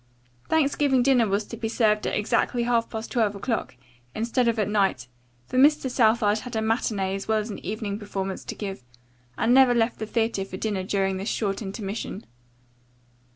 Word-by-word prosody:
Thanksgiving 285 -4 +2
dinner 250 -4 +4
was 200 +1 0
to - - -8
be 225 -1 -3
served 215 -2 +2
at - - -1
exactly 235 +3 +1
half 235 -1 +1
past 220 0 -6
twelve 220 -5 +1
o'clock, 220 - -3 0.4
instead 235 +2 0
of 230 0 +1
at 210 - +1
night, 195 - +1 0.4
for 255 - -1
Mr. 280 -2 +4
Southard 220 -3 +3
had 245 +1 -8
a 220 - 0
matinee 215 -4 0
as 195 0 -5
well 220 0 +2
as 215 +1 -3
an - - -8
evening 210 +1 -4
performance 195 -2 -4
to - - -5
give 195 - -6 0.5
and 240 - +3
never 260 -2 +6
left 230 0 +1
the 220 - -4
theatre 225 -2 0
for 190 -1 -7
dinner 205 -2 -2
during 195 0 0
this 195 +3 -3
short 200 -2 -1
intermission. 205 +1 -5
220 Hz, 185 wpm, -25 LUFS, 200-235 Hz, 0.5 s, never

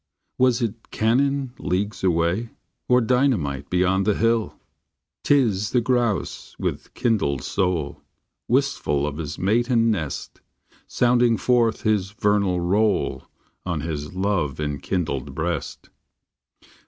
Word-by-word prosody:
Was 125 -2 +3
it 115 0 -5
cannon 135 +3 +1
leagues 100 +4 -2
away? 90 +5 +1 0.4
Or 125 0 +5
dynamite 110 - +1
beyond 95 +2 +1
the 105 - +3
hill? 115 -1 +1 0.7
T 145 - +4
is 105 -6 +1
the 125 - +2
grouse 120 -4 -1
with - - -4
kindled 100 - 0
soul, 90 -7 -1 0.5
Wistful 125 - +1
of 75 -1 -4
his 75 -2 -5
mate 115 +6 +1
and 115 -2 +3
nest, 80 -9 -4 0.5
Sounding 120 -1 +3
forth 120 -3 +2
his 105 -2 0
vernal 100 -4 +1
roll 100 +4 0 0.4
On 85 -5 -2
his 75 +1 -5
love 95 -8 -1
enkindled 75 -1 -3
breast. - - -4
105 Hz, 115 wpm, -23 LUFS, 85-120 Hz, 0.7 s, Or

